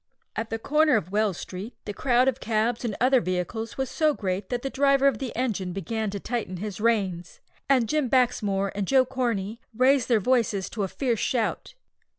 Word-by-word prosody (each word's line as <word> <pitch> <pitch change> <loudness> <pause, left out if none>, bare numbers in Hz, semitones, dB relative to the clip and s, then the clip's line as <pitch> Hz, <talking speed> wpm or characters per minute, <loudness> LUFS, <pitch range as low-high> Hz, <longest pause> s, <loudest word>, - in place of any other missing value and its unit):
At 225 0 -3
the 225 - -2
corner 300 +4 +3
of 190 -4 -1
Wells 205 -3 +1
Street, 195 +6 -7
the 205 - -4
crowd 250 +2 +2
of 265 - +1
cabs 225 +2 0
and 220 -4 -2
other 255 +1 +4
vehicles 185 +5 -3
was 265 0 -1
so 305 +2 +1
great 190 -1 -3
that 245 -1 -2
the 270 - -2
driver 275 0 +3
of 275 - +1
the 260 -4 -4
engine 205 -7 -2
began 215 +4 -3
to 200 0 -4
tighten 220 -5 -3
his 205 +1 -5
reins, 195 -7 0 0.3
and 255 -4 +4
Jim 300 -2 0
Baxmore 205 -6 +1
and 200 -2 -3
Joe 265 -1 +4
Corney 235 -5 -2 0.2
raised 260 0 +4
their 235 -3 +4
voices 220 -4 +1
to 220 - -4
a 195 - 0
fierce 235 +2 -1
shout. 240 - -1
230 Hz, 195 wpm, -26 LUFS, 200-255 Hz, 0.3 s, other